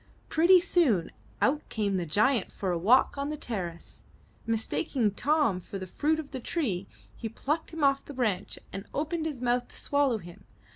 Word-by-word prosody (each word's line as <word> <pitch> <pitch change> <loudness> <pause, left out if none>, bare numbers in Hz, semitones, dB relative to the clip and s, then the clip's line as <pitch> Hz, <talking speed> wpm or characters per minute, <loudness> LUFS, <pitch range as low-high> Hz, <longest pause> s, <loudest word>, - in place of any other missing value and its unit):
Pretty 350 +3 +6
soon, 275 - +2 0.3
out 295 +2 +1
came 200 -3 0
the 175 -2 -2
giant 215 - +2
for 190 -2 -2
a 175 - 0
walk 245 +9 +4
on 280 +1 -1
the 305 - -3
terrace. 180 - -5 0.5
Mistaking 230 +1 0
Tom 280 -3 +2
for 195 - -7
the 185 - -5
fruit 300 - 0
of 300 -3 -7
the 265 - -4
tree, 235 - -2 0.3
he 225 - -5
plucked 300 +8 -2
him 325 -2 -4
off 275 0 +3
the 285 - -8
branch 210 -7 -1 0.2
and 195 +1 -6
opened 315 +2 -1
his 280 -6 -5
mouth 245 0 +1
to - - -13
swallow 285 -5 +1
him. 175 -4 -12
250 Hz, 185 wpm, -29 LUFS, 200-295 Hz, 0.5 s, Pretty